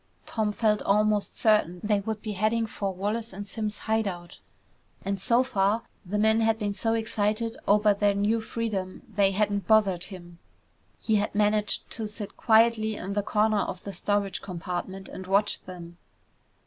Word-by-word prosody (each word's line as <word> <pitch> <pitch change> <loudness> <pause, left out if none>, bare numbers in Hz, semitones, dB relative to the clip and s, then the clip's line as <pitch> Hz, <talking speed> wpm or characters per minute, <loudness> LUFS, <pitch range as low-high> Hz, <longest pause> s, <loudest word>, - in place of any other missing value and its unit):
Tom 215 -2 -1
felt 210 0 +1
almost 210 0 +1
certain 210 -5 +3
they 210 -1 +2
would 215 +1 -4
be 215 - -3
heading 215 +3 +1
for 200 -2 -3
Wallace 210 +4 -3
and 205 +2 -7
Simms' 215 0 -3
hide 220 -1 0
out. 175 -2 -7 0.7
And 195 -1 -2
so 245 +3 +3
far, 215 -3 +1 0.2
the 200 +2 -3
men 220 +1 +4
had 225 0 +2
been 205 -2 -2
so 225 +2 0
excited 220 0 -1
over 210 0 +5
their 205 0 +2
new 210 +3 +1
freedom 215 -5 -4
they 200 -3 +2
hadn't 205 0 0
bothered 195 -5 +3
him. 175 -3 -11 0.6
He 220 -2 +1
had 205 0 -1
managed 210 0 +1
to 225 -1 -4
sit 210 -1 -7
quietly 220 -1 +3
in 195 0 -5
the 205 - +1
corner 210 +1 +2
of 185 - -3
the 200 - -6
storage 200 +2 -1
compartment 185 +1 -5
and 185 - -8
watch 200 +2 +2
them. 175 -2 -10
210 Hz, 170 wpm, -27 LUFS, 195-220 Hz, 0.7 s, over